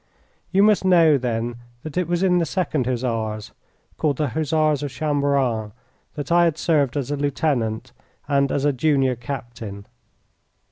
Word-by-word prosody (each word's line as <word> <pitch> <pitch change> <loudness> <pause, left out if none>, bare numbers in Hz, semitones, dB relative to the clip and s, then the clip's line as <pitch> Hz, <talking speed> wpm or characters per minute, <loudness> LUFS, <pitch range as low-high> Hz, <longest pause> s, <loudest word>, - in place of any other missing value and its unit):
You 195 +1 +4
must 210 -2 +4
know, 165 -6 +5
then, 120 -1 -2 0.3
that 155 - -7
it 180 -2 0
was 175 +1 0
in 180 -2 +3
the 170 - +1
Second 155 -7 -1
Hussars 115 -4 -2 0.5
called 145 -4 +1
the 150 -3 0
Hussars 155 +1 +1
of 145 - -3
Chamberan 140 -7 0 0.4
that 145 +2 -5
I 175 0 +5
had 165 -2 0
served 145 -5 +1
as 140 -1 -2
a - - 0
lieutenant 130 -5 -1 0.4
and 140 -1 +2
as 140 - 0
a 145 - +3
junior 135 -1 +2
captain. 120 -5 -7
140 Hz, 155 wpm, -22 LUFS, 120-155 Hz, 0.5 s, know